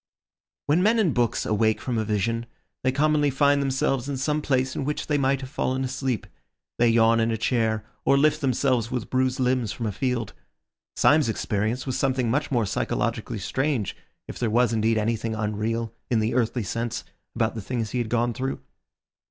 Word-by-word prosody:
When 155 +5 +3
men 220 +4 +4
in 190 -10 +2
books 120 -2 0
awake 110 +1 +2
from 120 -3 -2
a - - 0
vision, 115 +2 -1 0.4
they 130 - +3
commonly 150 +1 +2
find 140 +1 +3
themselves 135 -1 0
in 140 - -2
some 150 +3 0
place 130 -2 0
in - - -2
which 150 +2 -2
they 150 -2 +1
might 135 0 +1
have 130 - -7
fallen 130 -2 -1
asleep; 130 -3 -2 0.5
they 120 0 +5
yawn 115 0 +4
in 115 0 +2
a 115 - 0
chair, 110 -2 0 0.2
or 140 - +4
lift 155 +2 +3
themselves 130 -3 +1
with 125 -2 -4
bruised 130 0 +1
limbs 125 -4 +1
from 115 - -4
a 105 - -1
field. 125 -1 -2 0.6
Syme's 150 -5 +4
experience 110 +3 -1
was 130 -1 -2
something 130 -3 +1
much 145 +4 0
more 120 -5 +1
psychologically 105 +3 -2
strange 130 +2 -1 0.3
if - - -8
there 120 - 0
was 120 +1 +3
indeed 110 0 +2
anything 110 +1 -1
unreal, 110 +2 -2 0.2
in 120 - +2
the 110 +2 0
earthly 120 -1 0
sense, 115 +4 -3 0.3
about 110 0 +1
the 110 - -5
things 115 +1 -3
he 125 - -1
had 120 -2 -2
gone 120 0 +1
through. 130 +3 -3
120 Hz, 190 wpm, -25 LUFS, 115-135 Hz, 0.6 s, they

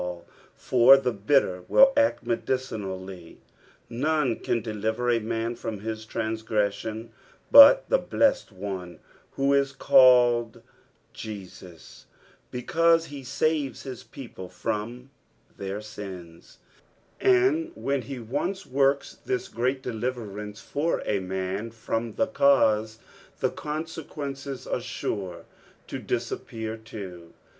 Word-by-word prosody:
l, 90 -1 -6 0.3
for 130 +2 +6
the 130 -2 0
bitter 100 -4 +1
will 270 0 +6
act 285 0 +2
medicinHlly. 95 -8 -4 0.5
Kone 135 0 0
can 120 - +1
deliver 110 +2 -1
a 115 - +2
man 115 +1 -2
from 110 -3 -6
his 110 0 -5
tranngre!«ion 110 0 -2 0.4
but 395 - +9
the - - +3
blessed 280 - +1
One 95 -2 -6 0.4
who 140 +1 +1
is 140 0 +2
called 120 -4 +4 0.5
Jesnp, 90 -5 -10 0.4
because 165 +6 +2
he 140 -3 -9
saves 145 +2 -1
his 130 -2 -7
people 115 -6 -10
from 115 +6 -4 0.4
their 100 +1 -5
sins; 95 -6 -10 0.6
and 370 -4 +3
when 140 -1 -1
he 135 +2 -7
once 145 - -3
woiks 135 +1 0
this 380 -1 -2
great 130 +2 -1
deliverance 110 -4 -5
for 155 +4 -1
a 100 - 0
mnn 95 +4 -4
from 115 0 -3
the - - +2
cause, 110 - +3 0.4
the - - +1
conseijuencea 145 -3 -6
are - - -1
sure 90 -4 -5 0.4
to - - -6
dis - - -2
appear 110 -1 -5
too. 95 -7 -10
115 Hz, 115 wpm, -26 LUFS, 105-140 Hz, 0.6 s, but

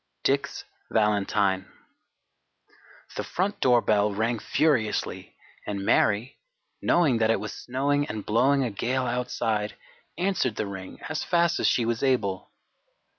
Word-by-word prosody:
DICK'S 140 +1 0 0.2
VALENTINE 100 -3 +1 1.4
The - - -2
front 200 +3 -2
doorbell 110 -5 +3
rang 110 +3 -1
furiously 130 -9 0 0.3
and 100 -1 -3
Mary, 105 +6 +2 0.4
knowing 150 -9 +3
that 110 -1 +2
it 115 - +2
was 105 - -5
snowing 145 +3 -1
and 105 -1 -5
blowing 135 +6 +3
a 120 - -2
gale 125 +5 -1
outside, 115 -4 -1 0.4
answered 175 - 0
the 110 - -2
ring 95 -2 -8
as 155 0 -3
fast 170 -1 +2
as - - +2
she 120 - +2
was 115 0 -1
able. 110 -9 0
115 Hz, 125 wpm, -26 LUFS, 105-140 Hz, 1.4 s, doorbell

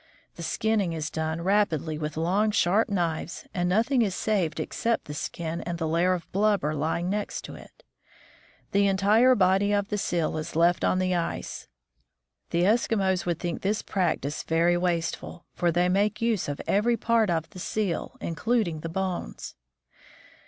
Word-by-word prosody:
The - - -9
skinning 200 +1 0
is 155 -1 -3
done 160 +1 -2
rapidly 170 -6 +1
with 155 0 -4
long, 190 +7 +2
sharp 205 +1 +2
knives, 170 -4 -2
and 175 -1 0
nothing 230 +7 +2
is 200 -5 0
saved 195 -7 0
except 230 0 -1
the 150 - -7
skin 165 +2 -4
and 170 -1 -4
the 160 -1 -2
layer 170 +3 +2
of 175 -2 -4
blubber 200 -6 +2
lying 160 +4 -1
next 205 +2 -3
it. - - -13 0.9
The 200 0 +3
entire 210 +6 +4
body 195 +1 +3
of 205 -1 0
the 210 - -1
seal 170 -4 -1
is 155 +1 -5
left 170 +2 +3
on - - +2
the 185 0 +1
ice. 170 -1 -3 0.8
The 170 0 +1
Eskimos 195 -3 +2
would 170 -2 0
think 175 -2 -4
this 205 +2 0
practice 160 -6 -1
very 170 +2 +2
wasteful, 175 -1 -2
for 175 -1 +1
they 175 +2 +2
make 205 +3 +1
use 230 -8 0
of 145 - -4
every 230 +4 +2
part 225 -2 +2
of 165 -1 -1
the 185 - -10
seal, 195 -2 -2
including 180 -1 0
the 165 - -5
bones. 185 +1 -4
180 Hz, 165 wpm, -26 LUFS, 165-205 Hz, 0.9 s, entire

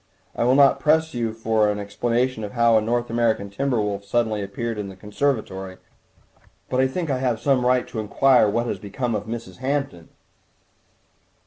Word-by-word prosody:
I - - 0
will 125 +2 +4
not 140 -1 +5
press 160 +2 +2
you 115 -2 -1
for 110 -1 +1
an 105 - -1
explanation 115 +4 -1
of 105 - -6
how 115 -1 +4
a 110 - +4
North 120 +2 -1
American 115 -4 0
timber 135 +2 0
wolf 100 -1 -2
suddenly 110 0 0
appeared 110 +3 -4
in 100 -1 -4
the 95 - -10
conservatory, 100 -3 -3 0.9
but 125 - +1
I 130 - +3
think 160 +3 -3
I 130 - 0
have 125 -4 0
some 135 0 +2
right 125 0 +2
to 110 - -5
inquire 125 +2 +3
what 115 +3 0
has - - -3
become 115 +3 -3
of 105 -1 -3
Mrs. 115 0 -6
Hampton." 130 - -3
115 Hz, 185 wpm, -23 LUFS, 105-130 Hz, 0.9 s, not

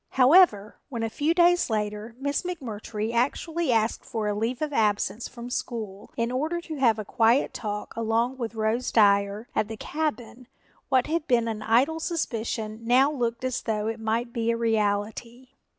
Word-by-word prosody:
However, 255 - +5
when 235 -4 -4
a 225 - -2
few 310 +7 0
days 350 -2 +4
later 210 +1 -3
Miss 285 +1 -1
McMurtry 230 - -5
actually 300 +5 0
asked 225 -1 +1
for 220 -2 -3
a 210 - 0
leave 225 +4 -2
of 305 -1 -3
absence 210 -1 0
from 240 0 -9
school 215 -5 -5
in 235 +1 0
order 310 +7 -1
to 320 -3 -7
have 230 -5 +4
a 215 - -5
quiet 230 +5 +2
talk 210 -1 -5
alone 230 +3 0
with 235 -3 -5
Rose 225 +3 0
Dyer 200 +1 +3
at 210 - 0
the 220 0 -7
cabin, 255 -4 -4 0.4
what 260 -2 +3
had 325 0 -2
been 235 -2 +2
an 220 -1 -3
idle 250 +9 +2
suspicion 225 -9 -3
now 255 +5 +4
looked 235 -4 -2
as 255 -1 -1
though 215 -2 -2
it 225 +1 -3
might 230 +2 -1
be 230 -1 -1
a 230 - +1
reality. 225 +2 -1
230 Hz, 175 wpm, -26 LUFS, 220-260 Hz, 0.4 s, However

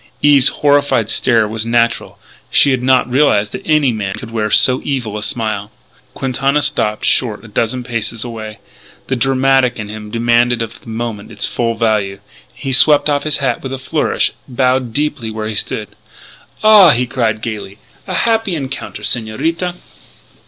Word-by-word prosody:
Eve's 145 -3 +6
horrified 145 -6 +2
stare 115 -4 +2
was 110 +1 -3
natural; 115 0 0 0.3
she 140 - +4
had 130 -2 0
not 130 0 +3
realised 125 -6 +2
that - - -6
any 150 -5 +3
man 100 -4 -3
could 120 -3 -9
wear 110 -2 -1
so 130 +4 +3
evil 125 -7 -3
a 105 - -4
smile. 105 -1 -2 0.5
Quintana 135 +2 0
stopped 110 -7 0
short 115 -3 0
a - - -10
dozen 115 +4 -2
paces 115 -1 -4
away. 110 -3 -7 0.5
The 130 - +1
dramatic 135 0 +2
in 105 -2 -6
him 105 0 -8
demanded 120 +1 +1
of 115 - -9
the - - -13
moment 115 -2 -5
its 105 -1 +1
full 115 -1 -2
value. 105 -4 0 0.3
He 135 - -6
swept 145 +2 +4
off 145 -1 +1
his 155 -1 0
hat 130 -4 -1
with 135 - -6
a - - -3
flourish, 130 - 0 0.2
bowed 130 -1 0
deeply 140 -3 -2
where 110 0 -5
he 110 - -3
stood. - - -2 0.7
"Ah!" 210 -4 +8
he 125 -3 +3
cried 115 -3 -1
gaily, 105 -3 -6 0.3
"the - - -3
happy 225 -5 +1
encounter, 135 -7 -6
Señorita. 130 - -1
120 Hz, 165 wpm, -16 LUFS, 110-135 Hz, 0.7 s, Ah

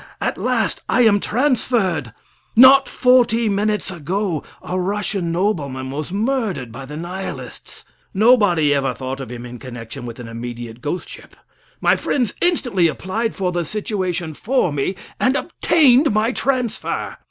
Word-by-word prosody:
At - - -1
last - - 0
I 250 - +3
am 205 -3 +5
transferred! 220 - 0 0.4
Not 265 +3 +8
forty 240 -3 +3
minutes 210 -1 0
ago 175 0 -2 0.2
a 185 +1 -2
Russian 195 -2 -1
nobleman 145 -9 -1
was 150 +4 -5
murdered 210 - -1
by 130 +3 -8
the 150 +2 -7
Nihilists. 180 +4 -7 0.3
Nobody 200 - +4
ever 135 -3 0
thought 130 +1 -5
of 135 -2 -7
him 120 0 -7
in 120 0 -9
connection 120 -1 -8
with 115 +1 -8
an 120 - -7
immediate 120 0 -7
ghost 150 +6 -3
ship. - - -12 0.5
My - - +4
friends 245 -7 -1
instantly 245 - +2
applied 215 +8 -2
for 185 -3 -1
the 175 -1 -1
situation 185 -3 -3
for 220 - 0
me, 145 +7 -1 0.2
and 260 +2 +2
obtained 290 -4 +3
my 215 +3 +2
transfer. 250 -4 -2
190 Hz, 145 wpm, -20 LUFS, 145-230 Hz, 0.5 s, Not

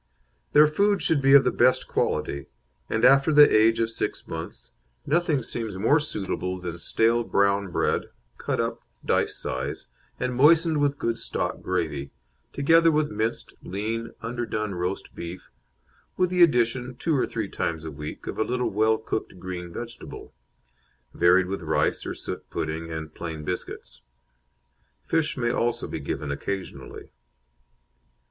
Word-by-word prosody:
Their 150 +1 +8
food 200 +7 +2
should 155 -3 +2
be 135 0 +5
of 140 - +8
the 125 - +2
best 130 - +3
quality, 70 0 -1 0.4
and 110 +2 +2
after 140 +3 +6
the 150 0 +7
age 110 +1 +4
of 115 0 0
six - - -4
months, - - -7 0.3
nothing 155 -3 +1
seems 110 -4 -4
more 115 +10 +4
suitable 95 -9 -3
than 85 -1 -6
stale 115 +5 +2
brown 100 -2 +1
bred, - - 0 0.3
cut - - -2
up - - -2 0.2
dice - - +1
size, 65 +3 -4 0.3
and 125 0 -1
moistened 155 +4 +5
with 145 0 +1
good 115 -3 -1
stock - - -2
gravy, 70 -4 -2 0.4
together 165 +4 +4
with 150 -1 +1
minced, 110 +2 -2
lean, 115 +4 -3
underdone 115 -3 -3
roast 90 +2 -4
beef, 85 +2 -8 0.7
with 180 -1 +2
the 180 -1 +2
addition, 125 -4 +3
two 160 +5 0
or 130 - +1
three 110 -3 -3
times 80 -4 -3
a 80 - -5
week, 75 +1 -8
of - - -5
a - - +4
little 125 +2 -1
well 110 +2 +3
cooked 110 -3 -4
green 90 -1 -6
vegetable, 120 +6 -8 0.8
varied 90 +2 +4
with 95 +1 -4
rice 80 -1 0
or - - -4
suet - - -6
pudding 80 +1 -4
and 80 -1 -6
plain 80 -3 -6
biscuits. 90 +3 -6 1.0
Fish 160 -3 0
may 120 -2 +1
also 120 -1 -1
be - - -5
given 75 -1 -4
occasionally. 95 +6 -6
115 Hz, 150 wpm, -25 LUFS, 90-140 Hz, 1.0 s, Their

